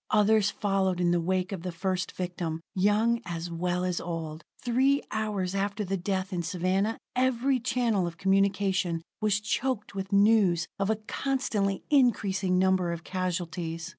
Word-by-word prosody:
Others 210 0 +4
followed 195 -3 0
in 175 -1 +2
the 175 -1 +2
wake 185 +2 0
of 190 -4 -4
the 180 +1 -4
first 185 +1 -2
victim, 175 -3 -4
young 215 +5 +2
as 170 -1 -5
well 180 +1 -1
as 180 -1 -1
old; 165 -2 -5 0.2
three 265 +4 +2
hours 210 -4 -1
after 200 +1 -1
the 195 +1 -1
death 190 +1 -2
in 175 - -1
Savannah, 185 +5 0 0.2
every 260 +1 +2
channel 235 -6 +1
of 165 -1 -7
communication 190 -3 +1 0.2
was 210 -1 +2
choked 215 +1 -2
with 195 -1 -5
news 200 -5 +4
of 195 +1 0
a 220 - +3
constantly 215 -9 -1
increasing 205 -9 +3
number 185 -1 +2
of 170 0 -5
casualties. 175 -2 -3
190 Hz, 155 wpm, -28 LUFS, 180-210 Hz, 0.2 s, Others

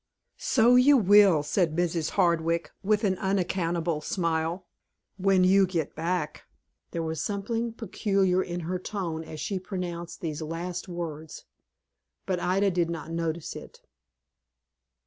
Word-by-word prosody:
"So 245 0 +4
you 275 +3 +6
will," 200 - +6
said 165 0 0
Mrs. 170 -2 0
Hardwick, 170 -2 +1
with 210 +2 +1
an 190 -3 +1
unaccountable 175 -4 -1
smile, 165 +1 -1 0.5
"when 190 -1 +3
you 190 +1 +5
get 170 -5 -2
back." 165 -1 -3 0.4
There 165 - -3
was 160 0 -3
something 225 +3 -2
peculiar 195 -5 +1
in 175 -1 -4
her 180 +2 -3
tone 175 -5 -4
as 155 -1 -9
she 190 +6 -2
pronounced 175 -3 -6
these 155 -2 -4
last 170 +3 -4
words, 160 -3 -6 0.8
but 185 -2 -1
Ida 195 +3 +2
did 175 -2 0
not 165 -1 -5
notice 165 -1 -3
it. - - -11
175 Hz, 130 wpm, -27 LUFS, 165-195 Hz, 0.8 s, you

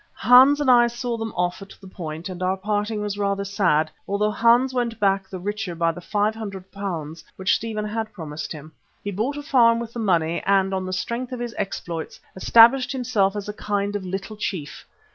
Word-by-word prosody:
Hans 260 +4 +6
and 280 -3 +3
I 240 -1 +6
saw 240 0 -3
them 225 -1 -4
off 180 +3 -1
at 195 - -11
the 195 - -13
Point 165 -2 -6
and 185 -1 -7
our 185 +1 0
parting 210 +2 -2
was 205 -1 -3
rather 200 0 -1
sad, 175 -6 +1 0.2
although 210 +1 0
Hans 235 +4 +3
went 235 -3 -2
back 195 -1 +1
the 190 - -6
richer 205 -1 -4
by 165 0 +1
the 175 - -10
£500 195 -6 -3
which 190 +1 +1
Stephen 215 -2 -3
had 220 +1 -3
promised 155 -5 -7
him. 155 0 -8 0.3
He 205 - -3
bought 230 +9 -2
a 290 - -6
farm 240 -6 +4
with 235 -1 -6
the 240 - -5
money, 170 -6 +1
and 195 -1 +2
on 190 -1 -2
the - - -4
strength 235 +7 -3
of 250 - -5
his 240 -1 -4
exploits, 170 -4 -5 0.2
established 235 +7 +5
himself 230 -6 +1
as 205 -1 -5
a 210 - -4
kind 205 -1 -2
of 205 - -3
little 195 +3 -5
chief. 160 -8 -5
205 Hz, 200 wpm, -23 LUFS, 185-230 Hz, 0.3 s, Hans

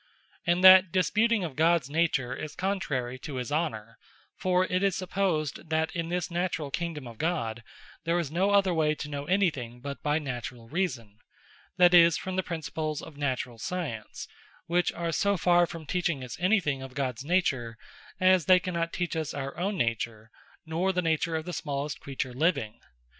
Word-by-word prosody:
And 175 +2 +2
that 185 -1 +9
disputing 210 +3 +2
of 155 -6 -5
Gods 165 -3 +3
nature 145 -5 0
is 155 - -7
contrary 135 -10 -2
to 145 0 -7
his 125 +1 -4
Honour: 115 -8 -2 0.4
For 185 0 +2
it 185 0 0
is 195 -2 +2
supposed, 175 -6 -2
that 160 +1 0
in 165 -1 -2
this 180 0 -2
naturall 170 -4 -2
Kingdome 165 -3 -3
of 115 -2 -10
God, 135 -9 -1 0.4
there 170 +1 +1
is 165 -5 -2
no 185 +5 +2
other 200 -2 +4
way 155 -2 +2
to 150 - -6
know 145 -1 -4
any 185 +2 +3
thing, 120 -3 -8
but 140 +2 -7
by 150 0 +1
naturall 125 -5 -5
Reason; 125 - -3 0.6
that 180 -1 +6
is, 170 -2 +7
from 185 0 -5
the 190 - +2
Principles 160 -3 -4
of 160 - -11
naturall 130 -4 -3
Science; 145 -10 -5 0.4
which 175 +1 +1
are 170 -1 -3
so 200 +4 +1
farre 175 0 +4
from 165 -2 -8
teaching 170 -4 -1
us 125 -3 -6
any 195 +5 +4
thing 145 -6 -2
of 130 -1 -9
Gods 130 -3 -2
nature, 135 -9 0 0.4
as 185 -3 +4
they 185 -1 +7
cannot 170 -2 -2
teach 175 -2 -2
us 160 -3 -3
our 140 -1 -4
own 195 +3 -2
nature, 115 -3 -2 0.3
nor 170 +4 0
the 180 -1 -1
nature 165 0 0
of 160 0 -3
the 180 - -5
smallest 145 -1 -3
creature 130 -2 -4
living. 135 -6 0
160 Hz, 185 wpm, -28 LUFS, 135-180 Hz, 0.6 s, that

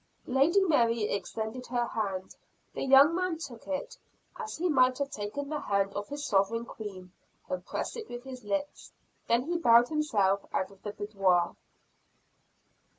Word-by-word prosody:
Lady 275 +9 +4
Mary 235 - +3
extended 220 +4 -3
her 240 0 0
hand; 195 -5 -3 0.4
the - - -5
young 275 +4 +7
man 365 -1 -1
took 265 -8 -9
it, 280 -1 -4 0.4
as 450 -3 -6
he 350 +3 0
might 255 -5 +4
have 280 0 -2
taken 210 +8 -4
the 300 0 -3
hand 200 -3 0
of 205 0 -4
his 290 +1 -5
sovereign 215 +2 +1
Queen, 190 -6 -8 0.4
and 180 -1 -3
pressed - - -3
it 450 -2 -7
with 240 0 -7
his 260 -2 -9
lips. 290 +7 -3 0.4
Then 235 +1 +3
he 340 +4 -1
bowed 235 -5 +6
himself 205 -11 +1
out 190 +1 -1
of 195 - -18
the 210 - -5
boudoir. 195 -5 +1
240 Hz, 160 wpm, -30 LUFS, 205-285 Hz, 0.4 s, young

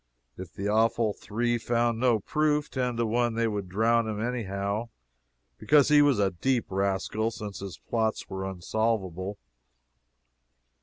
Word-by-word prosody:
If 90 -1 -9
the 100 - -3
awful 110 0 +2
Three 120 +4 -1
found 115 0 0
no 120 -2 +3
proof, 150 +4 0
ten 125 -3 -1
to 115 - +1
one 120 +1 +1
they 115 0 +1
would 100 -4 -3
drown 115 +4 +2
him 105 -1 -3
anyhow, 110 -2 -2 0.7
because 145 -2 +4
he 150 -1 +7
was 145 -4 +4
a 100 -2 +2
deep 120 +6 -1
rascal, 100 +3 0
since 105 -3 -7
his 95 -2 -7
plots 110 -2 -2
were 95 -1 -5
unsolvable. 95 0 -2
110 Hz, 145 wpm, -27 LUFS, 100-120 Hz, 0.7 s, he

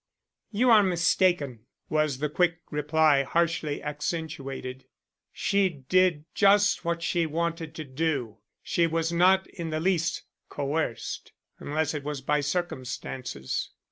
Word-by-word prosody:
"You 235 +3 +3
are 220 -2 +8
mistaken," 170 - +1 0.2
was 155 -3 +1
the 150 +3 -1
quick 170 +2 +1
reply, 150 -1 +3
harshly 160 0 0
accentuated. 145 -4 -4 0.5
"She 200 -1 +1
did 165 +1 +1
just 205 0 +4
what 170 0 -2
she 170 -1 +1
wanted 165 0 -3
to 155 - -5
do. 135 -6 -2 0.2
She 170 -1 +2
was 165 0 -1
not 190 +2 +4
in 170 -3 -6
the 155 0 -1
least 170 -1 0 0.3
coerced, 145 -4 -3 0.3
unless 155 +1 -1
it 150 -2 -4
was 145 -1 -4
by 150 +2 +1
circumstances." 130 - -3
160 Hz, 125 wpm, -27 LUFS, 145-170 Hz, 0.5 s, are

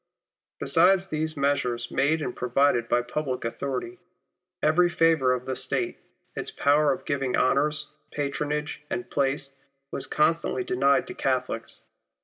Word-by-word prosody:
Besides 185 +3 +4
these 155 -3 -3
measures 135 -4 0
made 155 +3 +1
and 125 - -4
pro 125 - -4
vided 125 -2 +3
by 120 - +2
public 130 0 -3
authority, 140 +9 -4 0.6
every 175 +3 +4
favour 165 -6 +3
of 125 0 -1
the 130 - -2
State, - - -1 0.4
its - - -3
power 145 +1 +3
of 130 - -4
giving 135 -3 0
honours, 145 +4 +1 0.2
patronage 150 +1 -3
and 185 -1 -4
place, 135 0 0 0.4
was - - -3
constantly 165 - +1
denied 370 0 +2
to - - -7
Catholics. - - -2
145 Hz, 135 wpm, -26 LUFS, 130-160 Hz, 0.6 s, Besides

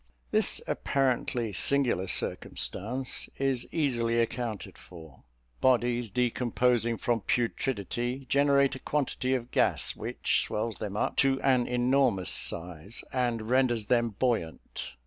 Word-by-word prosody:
This - - +2
apparently 125 -4 0
singular 125 -5 +1
circumstance 125 +8 -2
is 135 -3 0
easily 120 -7 +1
accounted 115 -2 -3
for. 80 -6 -14 0.4
Bodies 120 -2 +2
decomposing 120 0 +1
from 115 -1 0
putridity, 120 +2 -1
generate 140 0 +3
a 130 - -6
quantity 130 -3 -1
of 120 -1 -5
gas, - - +1
which - - 0
swells 110 0 -3
them 105 -1 -5
up - - -1
to 135 -1 +3
an 130 -3 +3
enormous 125 - +2
size, 85 +4 -1
and 120 -3 0
renders 125 -4 +2
them 120 0 +2
buoyant. 85 - -2
120 Hz, 115 wpm, -29 LUFS, 110-130 Hz, 0.4 s, generate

